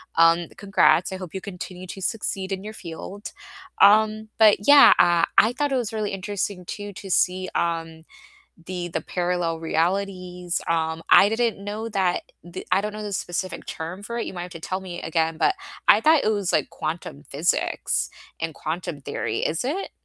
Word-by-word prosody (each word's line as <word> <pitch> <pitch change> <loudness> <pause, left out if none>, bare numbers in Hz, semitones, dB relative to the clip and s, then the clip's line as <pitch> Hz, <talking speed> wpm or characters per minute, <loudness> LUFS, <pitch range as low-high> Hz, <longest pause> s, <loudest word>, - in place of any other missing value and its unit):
um, 165 +1 +4
congrats, 190 -2 +3
I - - -3
hope 185 -4 -9
you 190 - -3
continue 185 -1 -8
to 195 - -8
succeed 195 -1 -3
in 190 0 -3
your 215 - -6
field, 190 +2 -8 0.5
um, 215 +1 +5
but 210 -2 +5
yeah, 285 0 +9
uh, 175 -1 +5
I 225 +3 +6
thought 290 +2 -1
it - - +1
was 240 -4 -2
really 215 -2 -2
interesting, 195 -1 -4
too, 205 +3 -6
to 195 +1 -9
see, 185 +1 +2
um, 165 -1 -2 0.6
the 180 -1 -4
the 165 - -3
parallel 175 -2 -1
realities, 180 +1 -1
um, 160 0 0
I 200 - +8
didn't 225 -3 0
know 215 +2 -4
that 190 -4 0 0.2
the 175 +2 -8
I 185 +2 +4
don't 210 0 -3
know 215 0 -6
the 205 -1 -5
specific 185 +1 -4
term 170 +5 -6
for 235 +3 -5
it, - - -2
you - - -5
might 175 - -5
have 180 0 -8
to 165 - -9
tell 185 +3 -3
me 180 -2 -7
again, 160 0 0
but 390 - +3 0.3
I - - +7
thought 315 -1 +5
it 215 - +3
was, 200 -4 -1
like, - - +1
quantum 155 -2 -5
physics 155 +5 0 0.3
and 165 -1 -3
quantum 160 -1 -4
theory, 140 - -3
is 160 +6 -1
it? 330 +10 -2
185 Hz, 190 wpm, -24 LUFS, 170-205 Hz, 0.6 s, yeah